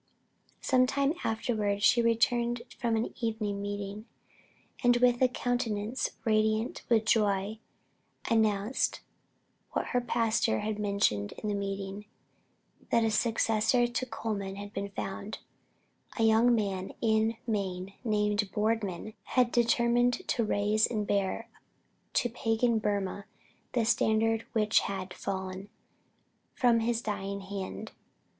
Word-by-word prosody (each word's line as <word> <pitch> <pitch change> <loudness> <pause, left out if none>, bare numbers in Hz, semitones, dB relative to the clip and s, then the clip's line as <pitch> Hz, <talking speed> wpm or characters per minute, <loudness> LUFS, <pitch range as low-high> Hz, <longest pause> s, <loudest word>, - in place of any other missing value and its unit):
Some 255 -1 +3
time 280 +2 +1
afterward 215 -2 -1
she 240 - +5
returned 235 +1 +2 0.2
from 235 -2 +1
an 225 +1 -1
evening 215 -3 -1
meeting, 205 +2 -5 0.8
and 245 0 +5
with 245 0 +3
a 255 - +6
countenance 245 -2 -1 0.2
radiant 215 +1 +1
with 225 -2 +3
joy, 210 -1 +1 0.7
announced 220 0 +1 0.7
what - - -1
her 245 - +1
pastor 230 - +1
had 215 -1 -3
mentioned 200 - +1
in 215 - -5
the - - 0
meeting 195 0 -4 0.8
that 230 - +3
a 225 - +2
successor 225 +1 +2
to 240 +1 -2
Colman 210 -4 -4
had 205 +1 -8
been 200 +1 -3
found; 195 +2 -5 0.8
a 225 - +1
young 225 +2 +5
man 195 -4 -2
in 220 0 +2
Maine 195 -4 -2
named 210 -2 +1
Boardman 215 -2 -1
had 250 -2 +1
determined 240 +1 +2
to 235 - +2
raise 210 +1 +2
and 215 -3 -2
bear 200 +3 -1 0.7
to - - +3
pagan 225 0 +1
Burmah 200 -1 -2 0.5
the 235 -2 +2
standard 225 0 +2
which 215 -1 +4
had 190 -2 -4
fallen 190 0 -5 0.9
from 240 -2 +4
his 235 +1 0
dying 200 -2 -3
hand. 195 +2 -6
220 Hz, 125 wpm, -30 LUFS, 200-235 Hz, 0.9 s, a